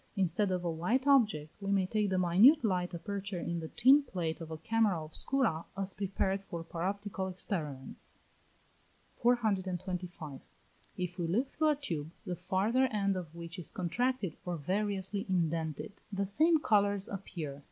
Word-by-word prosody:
Instead 195 +1 +2
of 180 -1 -1
a 170 - +1
white 215 +12 0
object 215 - +3
we 195 0 -1
may 195 -2 +3
take 210 +1 0
the 190 - +1
minute 195 - +6
light 180 -3 0
aperture 195 +2 -4
in 170 0 -2
the 160 - -5
tin 270 - +6
plate 175 - -3
of 160 - -6
a 160 - -5
camera 220 0 +2
obscura, 165 - 0
as 195 -1 -2
prepared 195 0 -1
for 170 -3 -6
paroptical 190 +3 -3
experiments. 155 -8 -4 1.0
425. 185 - -1 0.6
If 180 0 -4
we 170 - 0
look 235 +11 +1
through 310 0 +2
a 300 - +3
tube, 165 - -4 0.2
the 180 - -2
farther 195 +9 +2
end 200 -4 0
of 170 -3 -6
which 170 +2 -7
is 175 - -3
contracted 200 - -1
or 175 -1 -3
variously 195 +4 -2
indented, 165 0 -1
the 200 0 0
same 315 - +5
colours 205 -5 +3
appear. 180 -6 -5
426. 140 0 -9
190 Hz, 160 wpm, -32 LUFS, 170-210 Hz, 1.0 s, minute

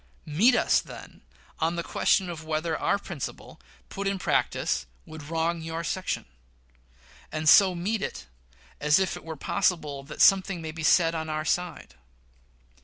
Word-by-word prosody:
Meet 200 - +4
us, - - +3
then, - - -12 0.4
on 165 +1 0
the 170 - -2
question 190 - +1
of 165 -2 -6
whether 160 +1 -2
our - - +1
principle, 175 -8 -8 0.3
put 200 0 -4
in 195 0 0
practice, 180 - 0 0.2
would 155 -2 -10
wrong 165 +1 -1
your 165 +1 -4
section; 185 +2 -3 1.1
and 155 0 -3
so 185 +3 +7
meet 195 +5 -2
us - - -5 0.5
as 150 0 +4
if 190 -1 0
it - - -10
were 160 0 -6
possible 155 -4 -1
that 145 +2 -11
something 195 -2 +4
may 160 -1 -5
be 160 +1 -8
said 165 +1 +4
on 160 -1 -4
our 155 0 -2
side. 170 - -2
165 Hz, 160 wpm, -27 LUFS, 155-185 Hz, 1.1 s, so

